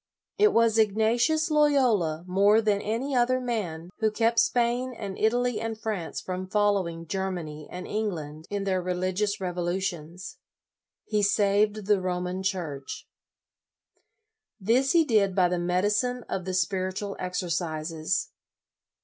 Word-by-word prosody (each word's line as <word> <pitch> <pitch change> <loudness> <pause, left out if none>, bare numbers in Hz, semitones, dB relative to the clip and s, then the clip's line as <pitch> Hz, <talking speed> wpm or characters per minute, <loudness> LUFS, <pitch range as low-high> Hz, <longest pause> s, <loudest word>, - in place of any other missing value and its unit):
It 425 0 +6
was 230 -1 +3
Ignatius 230 - +2
Loyola, 250 - +3
more 200 +4 +4
than 210 -2 +1
any 240 +7 -2
other 250 +1 +3
man, 185 -9 -4
who 220 -1 +3
kept 230 +2 +2
Spain 245 +1 +1
and 200 -3 -5
Italy 240 +1 +1
and 225 -1 -3
France 210 -7 -3
from 185 0 -5
following 190 -5 0
Germany 170 -5 -4
and 180 0 -7
England 160 -8 -4
in 205 -1 -2
their 190 -2 0
reli 180 +1 -1
gious 205 +1 -1
revolutions. 180 -1 -3 0.7
He 210 -1 0
saved 205 +1 +2
the 205 -2 +3
Roman 180 0 -2
Church. 170 -8 -4 1.5
This 240 +7 +2
he 335 -2 +5
did 205 -7 +2
by 185 -2 +4
the 180 0 -1
medicine 210 +8 0
of 185 - -3
the 185 -1 -2
Spiritual 185 +2 -1
Exercises. 170 -2 -2
200 Hz, 130 wpm, -27 LUFS, 180-225 Hz, 1.5 s, It